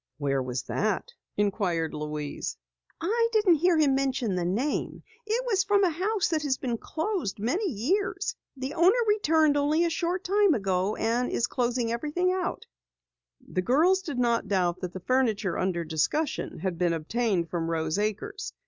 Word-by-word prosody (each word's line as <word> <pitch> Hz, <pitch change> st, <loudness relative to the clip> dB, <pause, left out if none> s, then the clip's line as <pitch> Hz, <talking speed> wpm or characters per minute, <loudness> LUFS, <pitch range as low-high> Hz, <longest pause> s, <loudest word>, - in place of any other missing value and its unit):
"Where 140 Hz, -2 st, 0 dB
was 125 Hz, -1 st, -3 dB
that?" 210 Hz, -2 st, -2 dB, 0.2 s
inquired 190 Hz, -6 st, 0 dB
Louise. 150 Hz, -1 st, -4 dB, 0.4 s
"I 460 Hz, +7 st, +1 dB
didn't 410 Hz, -7 st, +4 dB
hear 350 Hz, +2 st, +3 dB
him 295 Hz, -3 st, +4 dB
mention 265 Hz, -5 st, 0 dB
the 180 Hz, -1 st, -1 dB
name. 230 Hz, +12 st, -2 dB, 0.2 s
It 470 Hz, +3 st, 0 dB
was 400 Hz, -6 st, +2 dB
from 405 Hz, +1 st, +3 dB
a 360 Hz, -, +3 dB
house 385 Hz, +5 st, 0 dB
that 320 Hz, -2 st, 0 dB
has 275 Hz, -3 st, 0 dB
been 240 Hz, -4 st, -3 dB
closed 335 Hz, -, -3 dB
many 295 Hz, -, 0 dB
years. 380 Hz, -, -1 dB, 0.2 s
The 265 Hz, +2 st, -4 dB
owner 360 Hz, +7 st, +4 dB
returned 320 Hz, -8 st, +3 dB
only 300 Hz, +4 st, +2 dB
a 335 Hz, -, 0 dB
short 350 Hz, +2 st, -1 dB
time 400 Hz, -2 st, +3 dB
ago 195 Hz, 0 st, 0 dB
and 240 Hz, +2 st, 0 dB
is 235 Hz, -, +1 dB
closing 240 Hz, -2 st, -1 dB
out -, -, 0 dB
everything." 350 Hz, +9 st, 0 dB, 1.1 s
The 185 Hz, -8 st, -1 dB
girls 325 Hz, -, +3 dB
did 295 Hz, -8 st, -5 dB
not 235 Hz, -3 st, +1 dB
doubt 185 Hz, -3 st, +1 dB
that 180 Hz, -1 st, -4 dB
the 185 Hz, -, -5 dB
furniture 220 Hz, -5 st, +1 dB
under 180 Hz, -2 st, 0 dB
discussion 165 Hz, -, -1 dB
had 175 Hz, 0 st, -3 dB
been 175 Hz, -2 st, +2 dB
obtained 175 Hz, +1 st, -1 dB
from 165 Hz, -2 st, -2 dB
Rose 160 Hz, +2 st, -1 dB
Acres. 215 Hz, -, -3 dB
250 Hz, 165 wpm, -27 LUFS, -, 1.1 s, didn't